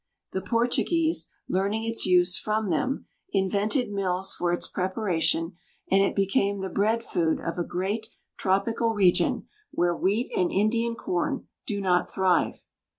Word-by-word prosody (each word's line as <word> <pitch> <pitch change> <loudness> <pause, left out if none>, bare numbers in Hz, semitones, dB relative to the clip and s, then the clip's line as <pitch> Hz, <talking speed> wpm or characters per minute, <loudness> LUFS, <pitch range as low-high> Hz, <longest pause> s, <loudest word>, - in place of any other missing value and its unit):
The 190 - -2
Portuguese, 245 - +1 0.2
learning 200 +4 0
its 230 -2 +1
use 180 0 +4
from 215 -1 -1
them, 270 +7 -1 0.3
invented 205 +5 +1
mills 190 -1 0
for 175 -1 -1
its 175 - -1
preparation, 180 -3 -1 0.3
and 195 +1 +5
it 195 - +1
became 200 0 +1
the 190 -1 -4
bread 220 +5 +1
food 165 -7 0
of 165 +1 -4
a - - +1
great 195 +6 -3 0.3
tropical 225 +4 +1
region 185 -4 +2 0.2
where 175 0 +1
wheat 205 +8 0
and 180 - +1
Indian 230 +3 +1
corn 205 +8 -2 0.2
do 205 -3 -1
not 180 -2 +1
thrive. 185 -3 +1
195 Hz, 145 wpm, -26 LUFS, 180-225 Hz, 0.3 s, and